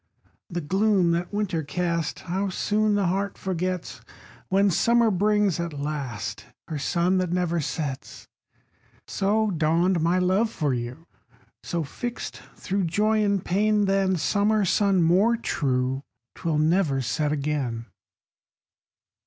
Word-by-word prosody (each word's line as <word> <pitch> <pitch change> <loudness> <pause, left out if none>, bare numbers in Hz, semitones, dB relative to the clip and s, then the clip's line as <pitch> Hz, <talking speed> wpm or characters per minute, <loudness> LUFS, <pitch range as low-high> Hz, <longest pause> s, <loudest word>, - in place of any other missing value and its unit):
The 175 -2 -3
gloom 190 +2 +2
that 170 +1 -1
winter 205 -5 -1
cast, 170 +1 -2
How 190 +3 -2
soon 210 +3 +1
the 200 -1 +1
heart 195 +2 -1
forgets, 185 -1 -3 0.5
When 195 +1 +3
summer 235 +5 +3
brings, 205 -1 +2
at 170 -2 -3
last, 135 -8 -4 0.2
Her 155 -3 -4
sun 180 +5 +1
that 180 -2 -1
never 175 -1 0
sets! 140 -2 -5 0.8
So 210 +2 +1
dawned 170 +2 +2
my 170 +3 +2
love 190 +5 +2
for 150 - -1
you; 125 +6 -5 0.6
So, 170 -1 -2
fixt 240 - -6
thro' 195 +1 -2
joy 215 +5 +1
and 200 -2 0
pain, 210 +2 +2
Than 195 -1 +2
summer 205 +5 +2
sun 190 -1 +3
more 195 +8 +4
true, 130 - -1 0.3
'Twill 160 -2 -2
never 155 -3 +2
set 145 +5 -1
again. 140 -6 -2
180 Hz, 130 wpm, -25 LUFS, 155-200 Hz, 0.8 s, more